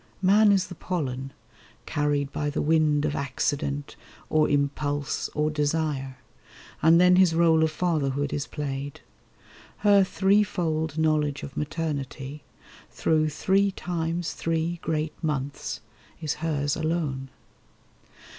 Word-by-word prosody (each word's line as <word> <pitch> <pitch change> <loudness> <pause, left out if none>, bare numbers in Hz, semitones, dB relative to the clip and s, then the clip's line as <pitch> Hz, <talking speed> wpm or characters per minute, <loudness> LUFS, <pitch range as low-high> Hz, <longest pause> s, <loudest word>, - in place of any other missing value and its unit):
Man 205 +3 +6
is 195 -2 +3
the 180 - -9
pollen, 135 -7 -3 0.5
carried 145 -1 0
by 145 0 -2
the 145 - -3
wind 150 -1 +3
Of 150 - -1
accident, 140 0 -2 0.4
or 155 -1 +3
impulse, 145 0 -1
or 150 +1 +1
desire; 145 -3 -1 0.6
And 165 +2 +6
then 180 0 +6
his 185 -3 +5
rôle 165 -1 +4
of 160 - +3
fatherhood 145 -4 -1
is 145 0 -2
played. 140 -1 -5 0.8
Her 200 -1 +7
threefold 180 -6 +1
knowledge 155 -2 +1
of 140 - -8
maternity, 150 -2 -4 0.5
Through 155 -1 +1
three 195 +6 +2
times 170 -2 -3
three 165 +1 -1
great 155 -1 -1
months, 145 -3 -3 0.4
is 155 -3 -1
hers 145 -3 0
alone. 155 -5 -2
155 Hz, 115 wpm, -26 LUFS, 145-165 Hz, 0.8 s, Her